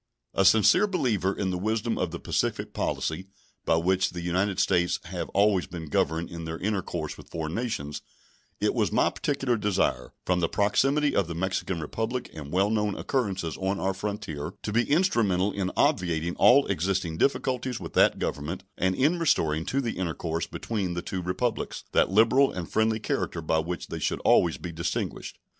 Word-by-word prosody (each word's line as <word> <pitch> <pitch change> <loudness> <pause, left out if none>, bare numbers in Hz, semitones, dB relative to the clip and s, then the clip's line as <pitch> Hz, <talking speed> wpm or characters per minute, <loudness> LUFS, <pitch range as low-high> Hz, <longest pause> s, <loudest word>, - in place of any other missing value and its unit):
A 95 - +2
sincere 110 - +6
believer 120 - 0
in 95 -1 -2
the 90 - -2
wisdom 110 +3 -1
of 90 - 0
the 85 - -5
pacific - - -2
policy 80 +4 -2 0.4
by - - +3
which 90 +3 +2
the 90 - -6
United 95 +3 0
States 90 -3 +2
have - - -5
always 100 -2 +2
been 80 -3 -7
governed 80 +4 0
in 85 -1 -6
their 80 0 -4
intercourse 90 -6 -3
with - - -13
foreign 80 -1 -4
nations, 95 -12 -3 0.6
it - - +1
was - - +1
my - - +3
particular 135 -4 -1
desire, 100 -11 0
from 90 -1 +2
the 85 - +1
proximity 135 +8 +2
of 100 - +2
the 85 - -5
Mexican 95 0 -2
Republic 110 +10 -3
and 75 -2 -8
well 95 +3 +2
known 105 -2 0
occurrences 95 - -1
on 95 +1 -1
our 95 0 0
frontier, 100 -6 -5
to 105 - -3
be 120 +1 +2
instrumental 115 - +2
in 95 -2 -2
obviating 85 -1 +1
all 135 +3 +6
existing 90 -2 -1
difficulties 130 -2 0
with - - -8
that - - +4
Government 80 +6 -3 0.2
and 95 +1 +2
in 155 - +2
restoring 80 - +1
to 140 - 0
the 115 -7 -3
intercourse 85 -2 -2
between 100 -6 -3
the 85 - -3
two 95 - -4
Republics 110 +7 -2
that - - +3
liberal 115 +7 +4
and 90 -3 -5
friendly 110 0 +1
character 85 - -2
by 80 0 +1
which 85 +2 -4
they - - -4
should - - -1
always 85 -2 +4
be 90 - -6
distinguished. 85 0 -3
95 Hz, 180 wpm, -27 LUFS, 85-110 Hz, 0.6 s, sincere